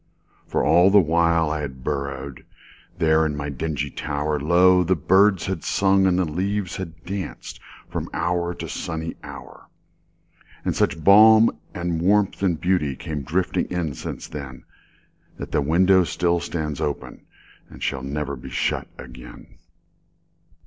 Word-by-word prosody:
For - - 0
all 90 +2 +5
the 100 +1 +6
while 85 -2 +2
I 75 - -2
had 65 -3 -7
burrowedThere 70 +3 -3
in 75 -2 -1
my 75 0 -4
dingy 70 0 -3
tower, 75 0 -2
Lo! 90 +4 +4
the 95 +2 +1
birds 95 +4 +3
had 95 -4 -4
sung 95 -1 +2
and 90 -1 +2
the 90 - +2
leaves 95 +4 -2
had 80 -4 -8
dancedFrom 95 0 -7
hour 85 0 -1
to - - -7
sunny 80 0 -5
hour. - - -11 1.0
And - - 0
such 80 - 0
balm 110 +4 +7 0.2
and 85 -2 -2
warmth 100 +2 +2
and 90 -5 +1
beautyCame 75 -4 -1
drifting 90 +4 0
in 85 -5 -2
since - - -7
then, 70 -3 -8 0.7
That - - -7
the - - +1
window 90 +6 +4
still 85 +2 0
stands 80 -4 -4
openAnd 75 - -4 0.6
shall 70 -1 -2
never 70 +1 -4
be 65 - -10
shut - - -1
again. 60 +2 -13
85 Hz, 135 wpm, -23 LUFS, 75-90 Hz, 1.0 s, balm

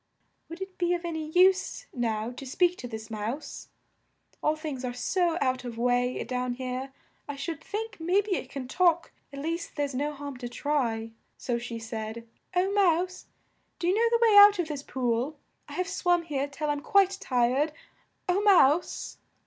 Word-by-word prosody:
"Would 335 +2 -8
it 380 -1 -7
be 350 0 +2
of 345 0 -5
an 340 - -2
y 315 -1 -4
use 380 +7 +3
now 230 -2 -1
to 250 - -9
speak 350 +7 +2
to 245 - -5
this 220 -1 -8
mouse? 220 +7 -5 0.7
All 305 - +2
things 300 -4 -5
are 245 -1 -3
so 345 +6 +1
out 255 -2 +1
of 240 -2 -6
way 245 +1 +1
down 250 0 -2
here, 255 +1 -4 0.4
I 285 - -3
should 315 +2 -5
think 430 -1 -5
may 355 +5 +2
be 410 0 -3
it 260 - -5
can 270 -2 -6
talk, 345 +2 +2 0.2
at 280 - -9
least 330 +4 -4
there's 285 -2 -1
no 290 +4 -1
harm 285 -2 -7
to 245 -1 -6
try." 240 -5 -1 0.3
So 240 -2 -2
she 235 -1 -5
said: 225 0 -6 0.3
"O 370 +2 +2
Mouse, 370 -2 +1 0.5
do - - -4
you 360 - +4
know 465 +2 +3
the 470 - +3
way 430 - +5
out 410 0 +9
of 345 -3 -1
this 290 -2 -4
pool? 255 +2 -1 0.3
I - - -8
have 365 0 -1
swum 350 -1 +1
here 285 -4 -2
till 295 +1 -2
I'm 290 -1 -2
quite 390 +1 +3
tired, 255 +4 +2 0.6
O 365 +2 +2
Mouse!" 350 -6 +3
290 Hz, 190 wpm, -28 LUFS, 250-355 Hz, 0.7 s, out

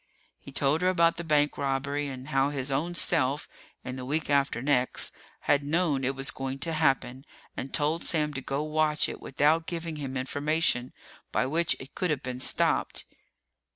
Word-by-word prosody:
He 140 - -12
told 140 +4 +1
her 185 - +3
about 170 -2 +3
the 170 - -4
bank 150 -2 +2
robbery 140 +1 -1
and 130 +1 -7
how 135 -1 +2
his 140 -1 -1
own 165 +6 -1
self 150 -5 +1 0.4
in 125 +1 -5
the 130 - -5
week 150 +3 -1
after 140 -3 +2
next 130 -1 +1 0.3
had 145 - +3
known 150 -2 +1
it 135 +1 0
was 135 -1 0
going 135 0 -4
to 165 +4 -1
happen, 135 -4 +1 0.3
and 135 - -5
told 155 +3 0
Sam 150 -2 0
to 135 - -4
go 140 +2 -2
watch 155 0 +1
it - - -7
without 155 +4 +2
giving 165 -2 -4
him 135 -2 -4
information 145 -1 0 0.4
by - - +1
which 165 +5 +1
it 130 - -11
could 180 - -1
have 150 -3 -1
been 125 -1 -4
stopped. - - +2
145 Hz, 185 wpm, -28 LUFS, 135-155 Hz, 0.4 s, her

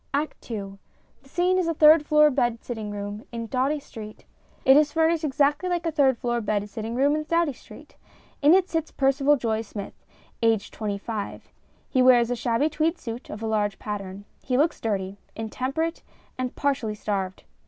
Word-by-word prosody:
] - - -42
ACT 295 -2 -3
II 195 -3 -5 0.4
The 270 - -21
scene 360 +4 +2
is 355 - 0
a 330 - 0
third 305 0 +7
floor 300 0 +5
bed 240 -4 0
sitting 220 -4 -5
room 205 +1 -5
in 230 -1 -4
Doughty 265 +6 0
Street. 215 -6 -11 0.4
It 265 0 +8
is 295 0 +4
furnished 325 0 +2
exactly 295 +4 +1
like 350 -1 -1
a 330 - +1
third 270 -5 +3
floor 240 0 -1
bed 205 -1 -1
sitting 225 +1 -5
room 280 +3 +3
in 305 0 -2
Doughty 335 -2 +1
Street. - - -15 0.4
In 300 +4 +7
it 380 -1 +3
sits 325 -3 -2
Percival 275 +1 +3
Joye 225 -3 -1
Smith, 205 -2 -7 0.5
aged 225 -3 +1
twenty 210 -2 -3
five. 210 0 -6 0.4
He 260 - +2
wears 245 -2 +5
a - - +1
shabby 235 +4 +1
tweed 315 +2 0
suit 235 -3 -7
oj 215 +2 -8
a - - -1
large 210 -2 0
pattern. 200 -1 -6 0.2
He 250 -1 0
looks 310 +4 +1
dirty, 200 -2 -2 0.2
in 220 -1 -5
temperate 320 +6 -2 0.3
and 255 -1 -4
partially 265 -7 -1
starved. 195 -3 -3
250 Hz, 190 wpm, -25 LUFS, 215-300 Hz, 0.5 s, It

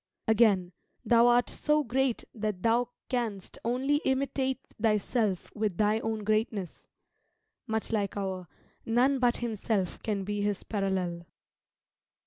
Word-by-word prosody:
Again 205 -5 +4 0.3
"Thou 235 +1 +6
art 245 0 +4
so 300 0 +1
great 260 0 0
that 210 -4 -3
thou 235 +1 +3 0.2
canst 225 -7 -3
only 260 +5 +1
imitate 265 -2 0 0.2
thyself 215 -2 +1
with 210 -5 -1
thy 215 +1 +3
own 220 -1 -3
greatness;" 215 -3 -1 0.8
much 220 0 -2
like 205 -3 -1
our 190 -2 -3 0.4
"None 255 +4 +2
but 245 -1 +3
himself 210 -4 -1
can 205 -3 -2
be 205 +1 -2
his 205 -1 -1
parallel." 185 -4 -2
220 Hz, 120 wpm, -29 LUFS, 200-245 Hz, 0.8 s, Thou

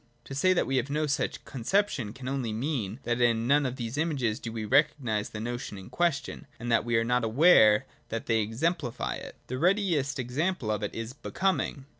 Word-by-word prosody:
To - - -9
say 185 +7 +3
that 180 - +1
we 135 - 0
have 130 +2 0
no 150 +2 0
such 145 +1 -2
conception 135 - 0
can 130 +3 -9
only 130 -4 -2
mean, 115 -2 -2
that 120 0 -1
in 115 -1 +3
none 140 +2 +3
of 125 - -4
these 120 +2 -4
images 135 -9 0
do 115 - -6
we 110 -1 -4
recognise 120 -4 +2
the 105 - -7
notion 120 -2 -4
in 95 - -11
question, 155 -3 -1
and 120 0 -3
that 115 - +4
we 120 0 +1
are 115 - +3
not 125 +1 +1
aware 110 -3 +6 0.2
that 115 0 -4
they 115 -1 +2
exem 125 +11 +1
plify 120 -6 -4
it. - - -9
The 130 +1 -4
readiest 170 -7 +2
example 130 +1 -1
of 105 - -1
it 105 - -4
is 115 +2 -5
Becoming. 165 -2 -1
125 Hz, 210 wpm, -28 LUFS, 115-145 Hz, 0.2 s, aware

